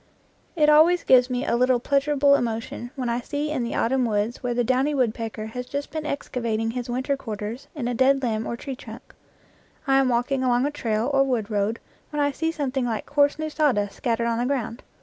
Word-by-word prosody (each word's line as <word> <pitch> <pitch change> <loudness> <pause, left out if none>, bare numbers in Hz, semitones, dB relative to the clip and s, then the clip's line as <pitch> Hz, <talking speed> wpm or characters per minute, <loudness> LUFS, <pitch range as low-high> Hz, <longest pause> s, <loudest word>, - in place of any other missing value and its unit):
It 305 -3 +3
always 320 +4 +5
gives 250 -1 +5
me 250 +1 -2
a - - +1
little 250 0 +3
pleasurable 280 +2 +3
emotion 235 -1 -2
when 255 -3 -3
I 235 +1 0
see 295 +4 -3
in 270 -5 -1
the 235 - -3
autumn 260 +2 +1
woods 215 +1 -1
where 245 -1 -2
the 245 - +2
downy 260 +5 +1
woodpecker 225 -3 -1
has 250 0 -5
just 285 +2 -4
been 310 -1 -4
excavating 230 -6 -2
his 245 0 -5
winter 260 +3 -1
quarters 225 -1 -6
in 260 -5 -3
a 245 - -1
dead 265 +2 +3
limb 220 -2 -1
or 235 - -3
tree 270 +1 -6
trunk. - - -12 0.7
I 270 -1 +4
am 265 -1 +2
walk 245 +2 0
ing 270 -1 +1
along 250 0 +2
a 290 - 0
trail 230 -2 -1
or 275 - +4
wood 235 -5 -1
road 210 +2 0 0.3
when 295 - -4
I 285 0 +2
see 325 +4 -1
something 275 -5 -2
like 225 -3 -2
coarse 290 0 +2
new 310 0 -3
sawdust 245 -11 +1
scattered 235 -1 -1
on 230 0 0
the 245 - 0
ground. 250 -3 -2
255 Hz, 220 wpm, -24 LUFS, 235-280 Hz, 0.7 s, always